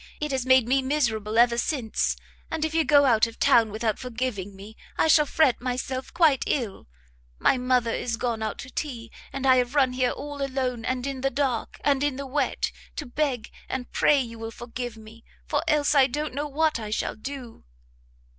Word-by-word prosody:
it 300 -1 -2
has 260 -1 -1
made 260 -3 +5
me 270 +2 +3
miserable 230 -6 0
ever 235 0 +5
since, 240 -5 0 0.3
and 320 -1 -1
if 315 - -3
you 325 0 +3
go 285 -2 +5
out 235 -3 +4
of 230 - -11
town 225 -2 +4
without 215 0 -2
forgiving 230 -6 -4
me, 205 +3 -11 0.2
I - - +3
shall 300 -1 +5
fret 290 -7 +2
myself 255 +1 -3
quite 320 -6 +3
ill! 235 -8 -2 0.5
my 255 - +3
mother 250 -2 +2
is 230 0 -2
gone 235 -2 -2
out 220 - -3
to 260 - -13
tea, 240 -7 -5 0.2
and 270 0 -4
I 260 -1 +6
have 250 +2 0
run 265 -3 +3
here 255 -1 +1
all 285 +1 -6
alone, 260 -4 -2
and 255 0 -1
in 275 -2 -4
the 270 - +2
dark, 270 -5 -2
and 280 -1 +2
in 290 -2 0
the 280 +1 -5
wet, 270 0 -1 0.2
to 300 - -4
beg 250 -3 -2 0.2
and 255 -2 -4
pray 290 - +4
you 230 -3 -5
will 225 0 -5
forgive 240 0 -6
me, 220 +1 -14 0.2
for - - 0
else 300 -1 +3
I 275 -3 +6
don't 300 +3 -3
know 290 +3 -2
what 300 -1 +1
I 215 -2 -5
shall 215 - -2
do!" 255 0 -8
255 Hz, 200 wpm, -26 LUFS, 230-280 Hz, 0.5 s, I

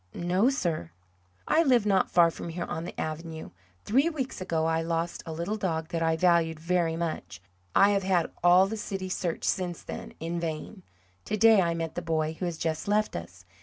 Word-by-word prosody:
"No, 180 +7 +2
sir." 170 - -2 0.6
"I 320 - +4
live 250 -8 +3
not 195 -2 +2
far 170 -1 +5
from 170 - -7
here 170 +1 -4
on 160 - -4
the - - -8
avenue. 160 +1 -5 0.3
Three 270 +9 +3
weeks 270 - -4
ago 165 -3 0
I 165 0 +1
lost 165 +1 -2
a - - -4
little 170 +7 -3
dog 165 -5 -2
that 165 - -2
I 160 0 +2
valued 165 -2 +3
very 170 0 0
much 160 - -4 0.4
I 200 +1 +6
have 200 -1 +2
had 185 -3 +1
all 180 +2 +7
the 220 +3 -4
city 195 -3 -4
searched 175 -2 -2
since 180 -2 -1
then, - - -8
in 170 +2 -3
vain. 170 +5 -5 0.4
To 215 - -2
day 220 -1 +6
I 170 -2 0
met 165 -1 -3
the 175 - -3
boy 160 -2 -1
who 185 - -2
has 170 -2 -3
just 160 +1 -2
left 210 +1 +1
us. 90 +2 -8
170 Hz, 205 wpm, -28 LUFS, 160-195 Hz, 0.6 s, all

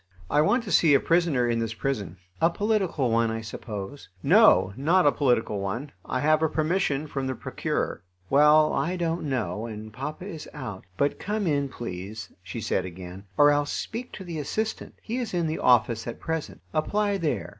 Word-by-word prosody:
"I 145 - +4
want 235 +10 +2
to 205 - -6
see 155 -3 +5
a - - +5
prisoner 165 -8 +2
in 115 -1 +1
this 115 0 -2
prison." 105 -10 -3 0.2
"A 165 - +5
political 190 - 0
one, 115 0 +3
I 115 0 -3
suppose?" 110 +3 -7
"No, 95 - +6
not 170 +8 +3
a 145 - +6
political 120 -8 +1
one. 115 +9 -4
I 130 - -2
have 155 +1 +3
a 160 - +2
permission 155 -2 0
from 135 -3 -3
the 130 - -2
Procureur." - - -3 0.3
"Well, 150 +4 +5
I 180 - 0
don't 170 -2 -1
know, 110 -4 -2
and 110 -1 -8
papa 150 - -6
is 165 -7 -7
out; 105 -10 -7
but 140 +5 +1
come 210 0 -2
in, 140 -4 +1
please," 105 -2 -7
she 105 +5 -6
said, 95 - 0
again, 90 +2 -9
"or 145 0 +7
else 145 0 +1
speak 240 +3 -4
to 190 - -7
the 170 -3 -5
assistant. 215 +10 -3
He 230 +2 -3
is 240 -7 -3
in 170 -1 +1
the 155 0 -2
office 120 -2 +3
at 115 - -5
present; 155 - -4
apply 205 +6 +1
there. 160 -4 -1
145 Hz, 190 wpm, -26 LUFS, 115-165 Hz, 0.3 s, or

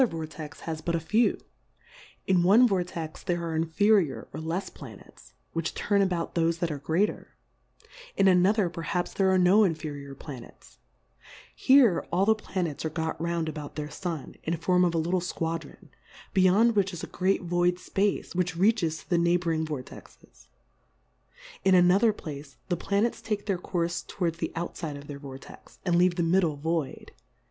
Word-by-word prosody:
145 165 -10 0
Vortex 155 -3 -9
has 160 -1 -5
but 170 +1 -1
a - - +1
few: 215 +9 +2 0.9
In 185 -2 +3
one 210 +8 +6
Vortex, 175 -5 -3
there 175 -2 -2
are 165 -1 -3
inferior 165 +1 +2
or 155 - -5
lefs 170 +5 -3
Planets, 105 - -13 0.2
which 165 -1 -2
turn 205 -1 +1
about 180 -3 -1
thofe 165 0 +1
that 170 -1 -2
are 145 - -4
greater; 160 +9 -1 0.8
in 195 - +4
another 190 +2 +4
perhaps, 175 +1 -3
there 195 -1 +2
are 190 - +4
no 185 +4 +5
inferior 150 -6 -3
Planets; 135 -4 -12 0.8
here, 260 -9 +5
all 185 +3 +2
the 220 - +5
Planets 185 -8 -4
are 160 - -1
got 160 0 -3
round 170 -1 -1
about 150 -2 -6
their 150 -1 -5
Sun, 170 -6 -5
in 165 +1 -2
form 180 +2 +2
of 170 -1 +1
a - - +2
lit 165 +2 -1
tle 185 -1 +2
Squadron, 165 -2 -5 0.4
beyond 200 +5 +4
which, 195 -2 +1
is 170 - -6
a - - -1
great 190 +1 0
void 175 0 +1
Space, 195 +2 -1
which 180 -2 -1
reaches 185 -5 +2
to - - -15
the 175 - +4
Neigh 170 +1 +3
bouring 165 -2 -1
Vortexes: 125 - -10 1.2
In 190 -1 +5
anothei* 195 +5 +4
Place, 145 -2 -8
the 175 - +1
Planets 205 +6 0
take 210 -2 -3
their 195 -4 -1
Courfe 170 -1 -2
towards 170 -3 -2
the - - -2
outfide 165 -3 -4
of 140 - -11
their 145 -1 -8
Vortex, 135 -1 -12
and 175 -2 +2
leave 175 0 +4
the 170 - 0
middle 165 -2 +2
void. 160 -1 -3
170 Hz, 175 wpm, -27 LUFS, 160-190 Hz, 1.2 s, one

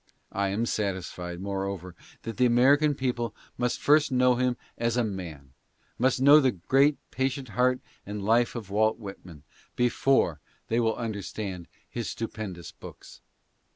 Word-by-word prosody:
I 100 0 0
am 105 +4 0
satisfied, 90 -4 -3
moreover, 95 -2 -4 0.3
that 115 - -6
the 125 - +4
American 140 +5 +4
people 120 -4 -2 0.2
must 125 0 -1
first 150 0 +4
know 125 0 +4
him 125 0 0 0.2
as 115 0 0
a 120 - +3
man 85 - -6 0.2
— - - -39
must 130 +1 +3
kn: 130 - 0
w: 145 +1 +8
le 130 - +4 0.2
great 140 +2 +4
patient 130 -1 -2
heart 125 +4 +2 0.2
and 105 0 -5
life 115 +3 +3
of 105 -5 -6
Walt 110 +2 +2
Whit 100 -4 -9
man 80 -6 -13 0.2
— - - -35
before 120 - +2 0.3
they 115 - +2
will 110 -1 +1
on 115 -2 -3
ierstand 95 -3 -6 0.2
his 120 -2 -4
stupendous 105 -6 -6
books. - - -13
115 Hz, 165 wpm, -27 LUFS, 100-125 Hz, 0.3 s, w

